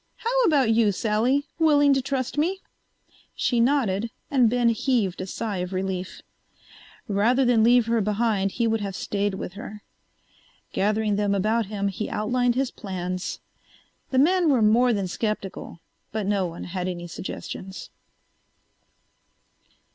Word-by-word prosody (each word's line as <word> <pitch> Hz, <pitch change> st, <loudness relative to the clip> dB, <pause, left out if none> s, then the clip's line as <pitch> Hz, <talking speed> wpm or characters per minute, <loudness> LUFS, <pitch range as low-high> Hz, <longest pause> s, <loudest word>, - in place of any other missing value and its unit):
"How -, -, 0 dB
about 275 Hz, -8 st, +3 dB
you, 225 Hz, -2 st, +3 dB
Sally? 230 Hz, +8 st, +1 dB
Willing 290 Hz, -3 st, +5 dB
to 270 Hz, -, +1 dB
trust 260 Hz, -1 st, -3 dB
me?" 350 Hz, +6 st, 0 dB, 0.7 s
She 240 Hz, -, +1 dB
nodded 230 Hz, -5 st, +1 dB, 0.2 s
and 255 Hz, -5 st, +4 dB
Ben 240 Hz, 0 st, +2 dB
heaved 225 Hz, -6 st, 0 dB
a 185 Hz, -, -5 dB
sigh 205 Hz, +1 st, -3 dB
of 180 Hz, +1 st, -4 dB
relief. 185 Hz, -1 st, -4 dB, 0.8 s
Rather 230 Hz, +6 st, +2 dB
than 240 Hz, -3 st, +4 dB
leave 240 Hz, 0 st, +5 dB
her 230 Hz, 0 st, +1 dB
behind 210 Hz, -1 st, 0 dB
he 235 Hz, -, 0 dB
would 225 Hz, -1 st, +1 dB
have 195 Hz, -2 st, -4 dB
stayed 200 Hz, 0 st, -2 dB
with 180 Hz, -, -6 dB
her. 210 Hz, +1 st, -9 dB, 0.9 s
Gathering 210 Hz, 0 st, +1 dB
them 205 Hz, -1 st, +1 dB
about 215 Hz, +2 st, +1 dB
him 200 Hz, -1 st, -2 dB
he 200 Hz, +2 st, -3 dB
outlined 245 Hz, +3 st, 0 dB
his 265 Hz, -1 st, 0 dB
plans. 185 Hz, -3 st, -5 dB, 0.7 s
The 260 Hz, -, -1 dB
men 340 Hz, +4 st, +4 dB
were 255 Hz, -6 st, +3 dB
more 240 Hz, +4 st, +4 dB
than 200 Hz, -4 st, -1 dB
skeptical 195 Hz, -4 st, -4 dB, 0.3 s
but 215 Hz, -1 st, -2 dB
no 195 Hz, -2 st, +1 dB
one 170 Hz, 0 st, -8 dB
had 180 Hz, 0 st, -4 dB
any 175 Hz, -1 st, -4 dB
suggestions. 185 Hz, +2 st, -7 dB
220 Hz, 145 wpm, -25 LUFS, 195-250 Hz, 0.9 s, Willing